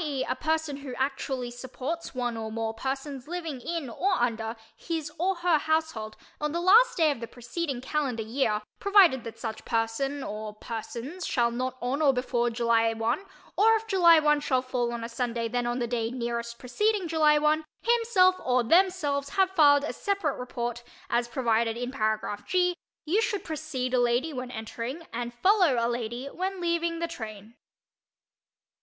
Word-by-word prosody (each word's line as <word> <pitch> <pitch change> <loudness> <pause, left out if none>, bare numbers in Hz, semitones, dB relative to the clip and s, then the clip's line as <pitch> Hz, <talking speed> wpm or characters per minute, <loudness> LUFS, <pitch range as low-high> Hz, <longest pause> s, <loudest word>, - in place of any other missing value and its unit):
e., 280 -4 -2
a - - +1
person 315 -2 -1
who 275 -3 -7
actually 265 -2 -2
supports 260 +6 -5
one 245 -2 -1
or 220 -1 -5
more 225 0 -2
persons 270 +2 -4
living 330 -6 -4
in 330 0 -3
(or 365 - 0
under) 230 -1 -1 0.2
his 320 -3 -4
(or 380 +3 +1
her) 345 -2 +2
household 315 -9 -1 0.2
on 300 0 -1
the 340 - -1
last 430 +8 +6
day 320 -3 +4
of 280 - -4
the 230 - -6
preceding 255 +4 -4
calendar 260 -4 -1
year, 220 -2 0 0.2
provided 380 - +5
that 230 - -8
such 220 -2 -5
person 240 +5 -1
or 210 0 -6
persons 240 +9 -6
shall 240 -6 +1
not 255 +2 -3
on 265 +5 -1
or 290 -3 +6
before 250 -1 0
July 230 -1 +2
1 230 - -1 0.3
or 445 +2 +5
if 445 0 -2
July 355 -6 +6
1 300 -1 +4
shall 260 -3 +1
fall 250 -2 -1
on 235 -1 -4
a - - -3
Sunday 235 -1 -2
then 245 +1 -1
on 240 0 -1
the 245 - 0
day 230 -1 -1
nearest 235 -1 -4
preceding 395 - 0
July 310 -2 +4
1, 305 +1 +2 0.2
himself 450 -6 +4
(or 250 -1 +2
themselves) 295 -2 +2
have 380 +2 +2
filed 290 -5 +5
a 300 - -3
separate 395 -8 -1
report 240 -1 -4 0.3
as 240 0 +1
provided 230 -2 +1
in 245 +1 -3
paragraph 215 -4 -1
(g), 360 -1 +2 0.3
you 375 +8 +2
should 420 -3 -1
precede 295 -5 -3
a 250 - +4
lady 245 +6 +1
when 250 -1 -5
entering, 240 +6 -6
and 240 0 -3
follow 360 - +3
a 230 - +2
lady 240 +1 -3
when 370 +6 -4
leaving, 340 -1 0
the 335 0 -2
train. 220 -8 -8
265 Hz, 175 wpm, -27 LUFS, 235-325 Hz, 0.3 s, last